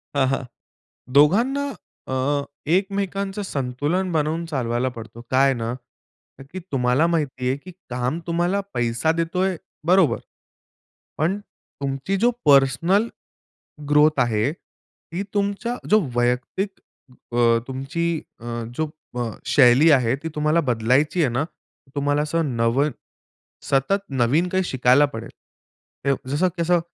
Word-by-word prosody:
हं, 140 -2 +3
हं. 135 +1 -1 0.7
दोघांना 235 - +4 0.4
अ, - - -1 0.6
एकमेकांच 195 +1 0
संतुलन 145 +8 -1
बनवून 160 +1 0
चालवायला 125 -4 -1
पडतो. 115 -1 -10
काय 135 +1 +4
ना? 115 -1 -3 0.8
की 185 - -5
तुम्हाला 125 +3 +2
माहिती 145 -7 -1
आहे, 135 - 0
की 180 +6 -12 0.2
काम 125 +5 -2
तुम्हाला 175 +4 +1
पैसा 120 +5 +1
देतोय 180 +3 0 0.3
बरोबर. 175 -10 +4 1.0
पण 170 +6 +1 0.5
तुमची 135 +7 -1
जो 235 +5 +3 0.2
पर्सनल 145 - +4 0.8
ग्रोथ 150 0 +4
आहे, 120 +2 +1
ती 175 +1 -10
तुमच्या 205 +4 -1
जो 215 +1 +6
वैयक्तिक 125 +11 0 0.7
अ, 115 -1 +5
तुमची 135 +5 -3 0.4
अ, - - -12 0.3
जो 155 -1 -1 0.3
अ, 115 -2 -1 0.2
शैली 135 +3 +6
आहे. 130 -4 +4
ती 160 +4 -6
तुम्हाला 150 +2 +2
बदलायची 130 +9 +2
आहे 145 - +3
ना 130 +5 0 0.5
तुम्हाला 145 +1 +1
असं 150 -4 -1
नव 115 +4 +2 0.9
सतत 165 +9 +2
नवीन 135 +7 +2
काही 190 +1 0
शिकायला 130 -1 +4
पडेल. 115 0 -6 1.0
जसं 150 +7 +2
कसं 170 +1 +3
145 Hz, 120 wpm, -23 LUFS, 125-175 Hz, 1.0 s, जो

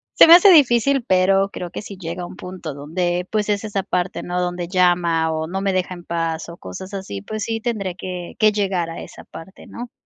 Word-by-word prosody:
se - - +9
me 330 - +10
hace 390 +2 +7
difícil, 275 -3 +4
pero 195 +1 +3
creo 175 -1 -5
que - - -6
si 200 -2 -9
llega 175 0 -5
a - - -5
un - - -11
punto 180 -5 -7
donde, 175 +5 -2
pues 215 -1 0
es 205 0 0
esa 200 -3 -2
parte, 180 +1 -2
¿no? 180 0 -2
Donde 175 -1 -3
llama 175 -3 +2
o 160 0 -2
no 190 +3 -3
me 195 -1 +1
deja 185 0 -1
en 175 - -12
paz 165 -1 -3
o 170 - -10
cosas 185 - -9
así, 100 - -6
pues 215 - -5
sí, 225 0 -3
tendré 215 -6 -2
que 180 -2 -6
que 215 0 +5
llegar 190 -5 -1
a 165 - -7
esa - - -11
parte, 175 +4 -12
¿no? 240 0 -8
185 Hz, 235 wpm, -21 LUFS, 175-205 Hz, -, me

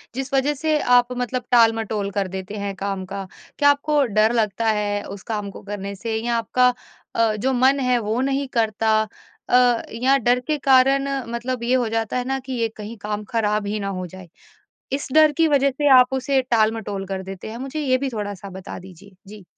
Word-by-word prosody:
जिस 270 +1 -4
वजह 275 +2 +2
से 310 +2 0
आप 245 0 +3
मतलब 250 0 -2
टाल-मटोल 225 -3 +3
कर 195 -1 -1
देते 190 +2 -6
हैं 200 -1 -3
काम 195 -1 -4
का। 195 0 -6 0.3
क्या 285 -1 +5
आपको 285 0 +2
डर 215 +1 +2
लगता 220 -1 0
है 205 -1 -1
उस 195 -1 -9
काम 205 -1 -3
को - - -11
करने 200 0 -6
से 225 +3 -4
या 235 0 0
आपका 250 +2 +2 0.4
अ, 225 -2 +2
जो 260 +5 0
मन 265 +3 +3
है 250 -1 +2
वो 220 +2 -2
नहीं 275 0 -1
करता? 220 -1 +2 0.5
अ, 245 -1 +4
या 260 +4 +3
डर 245 0 +2
के 305 -1 +1
कारण 270 0 +4 0.2
मतलब 240 +1 -3
ये 250 +2 +2
हो 245 -3 +1
जाता 225 +2 -1
है 250 - -1
ना 270 0 -1
कि 260 0 -7
यह 230 -2 0
कहीं 215 +2 -8
काम 210 0 -3
ख़राब 210 -2 0
ही 210 +1 -2
ना 200 - -3
हो 180 - -4
जाए। 185 0 -12 0.6
इस 280 - -2
डर 310 -1 +6
की 325 -1 +4
वजह 280 -2 +3
से 290 +3 -1
आप 250 +1 +3
उसे 265 0 +1
टाल-मटोल 220 -5 0
कर 190 -1 -4
देते 195 +2 -8
हैं? 230 - -7
मुझे 270 +4 -5
ये 255 -2 +2
भी 270 0 -2
थोड़ा-सा 205 -3 -6
बता 190 0 -8
दीजिए। 190 +1 -15
जी। 205 -2 -12
230 Hz, 210 wpm, -22 LUFS, 205-260 Hz, 0.6 s, डर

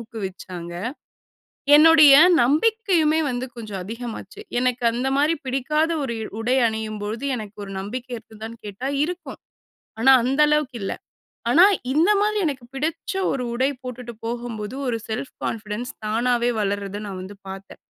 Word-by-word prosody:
ஊக்குவிச்சாங்க. 190 -6 -7 1.0
என்னுடைய 305 -2 +8 0.3
நம்பிக்கையுமே 320 - +2
வந்து 250 +1 -2
கொஞ்சம் 210 -4 -6
அதிகமாச்சு. 225 -1 -7 0.2
எனக்கு 250 -1 0
அந்த 250 +3 -1
மாரி 305 +3 +3
பிடிக்காத 300 +5 0
ஒரு 235 -4 -3
இ - - -3 0.2
உடை 250 +3 +2
அணியும்பொழுது 220 +2 -4
எனக்கு 215 -1 -9
ஒரு 195 - -9
நம்பிக்கை 245 +6 -6
இருக்குதான்னு 225 +1 -10
கேட்டா 225 +7 -4
இருக்கும். 330 -4 -5 0.6
ஆனா, 265 +4 +6
அந்த 270 +3 +1
அளவுக்கு 300 -4 +1
இல்ல. 195 - -2 0.6
ஆனா, 330 +8 +7 0.3
இந்த 320 +8 +3
மாதிரி 425 0 +1
எனக்கு 265 -5 -3
பிடிச்ச 315 +4 -3 0.2
ஒரு 255 -2 -2
உடை 260 +3 +1
போட்டுட்டு 250 -1 -7
போகும்போது 235 -1 -4
ஒரு 230 -2 0
செல்ஃப் 235 +5 -4
கான்ஃபிடன்ஸ் 215 +2 -4
தானாவே 240 +2 +1
வளர்றத 200 0 -2
நான் 190 -2 -6
வந்து 195 +2 -9
பார்த்தே. 195 0 -9
240 Hz, 140 wpm, -23 LUFS, 215-280 Hz, 1.0 s, என்னுடைய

